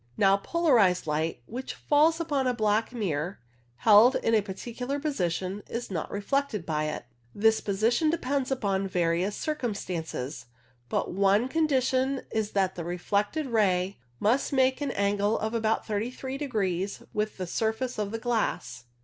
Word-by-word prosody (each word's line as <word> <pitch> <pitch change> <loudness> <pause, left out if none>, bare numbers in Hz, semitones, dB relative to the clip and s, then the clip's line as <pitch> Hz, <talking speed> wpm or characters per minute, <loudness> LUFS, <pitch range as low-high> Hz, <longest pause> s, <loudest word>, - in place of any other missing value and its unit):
Now, 195 -1 +5
polarized 230 - +3
light 155 -3 -2
which 255 +3 -6
falls 315 +3 +3
upon 290 -5 0
a 250 - +1
black 215 0 +1
mirror 180 - -2 0.4
held 220 - +6
in 225 - +1
a 220 - +5
particular 240 +7 -5
position 190 - -2
is 235 -2 -4
not 165 -4 -3
reflected 210 -1 -1
by 155 -1 -1
it. 155 - -4 0.3
This 220 +1 +3
position 225 - +1
depends 280 -4 -1
upon 200 -7 0
various 180 +2 0
circumstances, 175 - -4 0.4
but - - -1
one 200 +5 +3
con 320 +3 +1
dition 265 -1 +1
is 215 -1 -1
that 190 -2 +1
the 170 - -5
reflected 200 - -1
ray 195 - +1 0.2
must 235 +6 +2
make 265 0 +2
an 285 - -1
angle 205 -1 +1
of 220 +1 -2
about 220 -1 0
33 245 +5 -3
degrees 205 - -2
with 210 0 -2
the 185 - -3
surface 220 +6 -2
of 205 -1 -1
the 225 - -3
glass. 225 - -2
215 Hz, 150 wpm, -28 LUFS, 190-255 Hz, 0.4 s, held